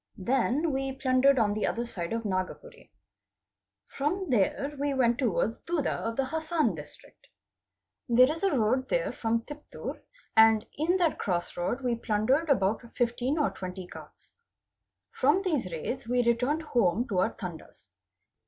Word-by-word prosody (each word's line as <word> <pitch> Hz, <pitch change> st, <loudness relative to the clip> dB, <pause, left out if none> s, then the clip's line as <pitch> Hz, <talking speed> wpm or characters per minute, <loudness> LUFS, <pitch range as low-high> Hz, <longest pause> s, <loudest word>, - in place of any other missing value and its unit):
Then 265 Hz, -, +1 dB
we 270 Hz, 0 st, -2 dB
plundered 265 Hz, +1 st, +3 dB
on 210 Hz, -3 st, +2 dB
the 215 Hz, -, -1 dB
other 235 Hz, +1 st, -2 dB
side 175 Hz, -7 st, -5 dB
of 230 Hz, 0 st, -2 dB
Nagpuree. 210 Hz, -, -4 dB, 1.0 s
From 340 Hz, +5 st, -2 dB
there 265 Hz, +6 st, +1 dB
we 285 Hz, -1 st, 0 dB
went 240 Hz, -2 st, +2 dB
towards 225 Hz, -2 st, 0 dB
Duddu 335 Hz, -5 st, -1 dB
of 230 Hz, 0 st, -3 dB
the 270 Hz, -, 0 dB
Hassan 315 Hz, +3 st, 0 dB
District. -, -, -13 dB, 0.8 s
There 250 Hz, +4 st, +6 dB
is 325 Hz, -, -5 dB
a 390 Hz, -8 st, +2 dB
road 250 Hz, +4 st, +1 dB
there -, -, 0 dB
from 230 Hz, 0 st, 0 dB
Tiptur, 295 Hz, +4 st, -8 dB, 0.3 s
and 220 Hz, 0 st, +6 dB
in 335 Hz, +5 st, +1 dB
that 345 Hz, -4 st, +1 dB
cross 175 Hz, -3 st, -2 dB
road 205 Hz, +9 st, -2 dB
we 250 Hz, -2 st, 0 dB
plundered 235 Hz, +7 st, +1 dB
about 210 Hz, -5 st, +2 dB
15 245 Hz, +4 st, 0 dB
or 300 Hz, -, +1 dB
20 185 Hz, 0 st, -7 dB
carts. -, -, -13 dB, 0.8 s
From 385 Hz, -, +2 dB
these 295 Hz, -, -1 dB
raids 235 Hz, -, -4 dB
we 245 Hz, +1 st, +2 dB
returned 250 Hz, +7 st, +1 dB
home 235 Hz, -, +1 dB
to 190 Hz, -4 st, 0 dB
our 190 Hz, +5 st, +1 dB
Tandas. 165 Hz, -, -9 dB
250 Hz, 155 wpm, -28 LUFS, 220-290 Hz, 1.0 s, There